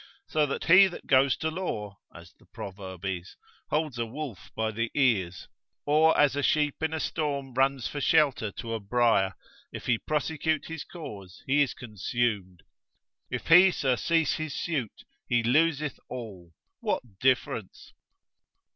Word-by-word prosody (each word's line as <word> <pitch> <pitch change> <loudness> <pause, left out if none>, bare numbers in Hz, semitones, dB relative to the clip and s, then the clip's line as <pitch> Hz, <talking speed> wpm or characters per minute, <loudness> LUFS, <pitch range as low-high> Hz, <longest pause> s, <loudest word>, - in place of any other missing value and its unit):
So 150 -1 +1
that 140 - -3
he 185 +3 +8
that 175 - -9
goes 135 -1 +4
to 160 0 -2
law, 105 - -4
as 85 0 -14
the - - -26
proverb 95 -1 -8
is, 95 -1 -4 0.3
holds 150 -5 -1
a 115 - 0
wolf 120 - -7
by 110 0 -1
the 115 +2 -2
ears, 100 - +1 0.4
or 155 +2 +4
as 145 -2 +4
a 145 - 0
sheep 150 +1 +1
in 160 0 0
a 160 - -2
storm 140 -5 -2
runs 135 -1 +1
for 145 - -5
shelter 140 -9 +2
to 115 -1 -5
a 115 - -2
brier, 105 -3 +2 0.4
if - - -8
he 120 -3 +2
prosecute 155 +1 -1
his 165 -2 -6
cause 100 - -10
he 140 +2 +3
is 140 - +1
consumed, 105 -4 -3 0.7
if - - -4
he 180 +3 +9
surcease 150 +1 +1
his 155 -2 -4
suit 140 - -3 0.2
he 120 -1 +2
loseth 150 +3 +1
all; 100 -9 -8 0.3
what 100 -6 -3
difference? 120 -5 -1
130 Hz, 155 wpm, -28 LUFS, 105-155 Hz, 0.7 s, he